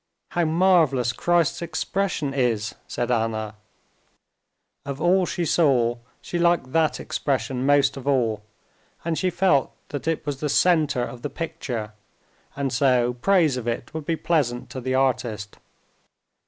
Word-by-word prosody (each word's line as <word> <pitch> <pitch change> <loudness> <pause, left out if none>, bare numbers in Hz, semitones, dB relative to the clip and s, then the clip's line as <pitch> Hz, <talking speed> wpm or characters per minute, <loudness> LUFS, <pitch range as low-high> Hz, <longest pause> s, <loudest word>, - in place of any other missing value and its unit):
"How 175 -1 0
marvelous 160 -8 +3
Christ's 170 +1 +1
expression 170 -2 -2
is!" 120 -5 0
said 120 0 -2
Anna. 110 -2 -1 1.3
Of 140 0 -5
all 180 +1 +3
she 175 - -2
saw 125 -8 +2 0.2
she 175 - -3
liked 170 -6 +2
that 160 0 +1
expression 130 -1 -2
most 145 -1 +4
of 135 0 -8
all, 115 -6 +1 0.6
and 165 -1 0
she 185 +3 0
felt 175 -6 +2 0.2
that 145 +2 -5
it 165 -2 -1
was 145 -2 -3
the 150 - -2
center 155 -5 +3
of 120 0 -7
the 145 - -3
picture, 135 -9 -5 0.6
and 135 -2 -2
so 125 -2 +3
praise 155 +1 +2
of 120 -2 -5
it 120 +4 -3
would 160 -2 -5
be 165 - +1
pleasant 140 -8 -1
to 130 - -5
the 130 +1 -1
artist. 120 -6 -1
140 Hz, 145 wpm, -24 LUFS, 120-165 Hz, 1.3 s, most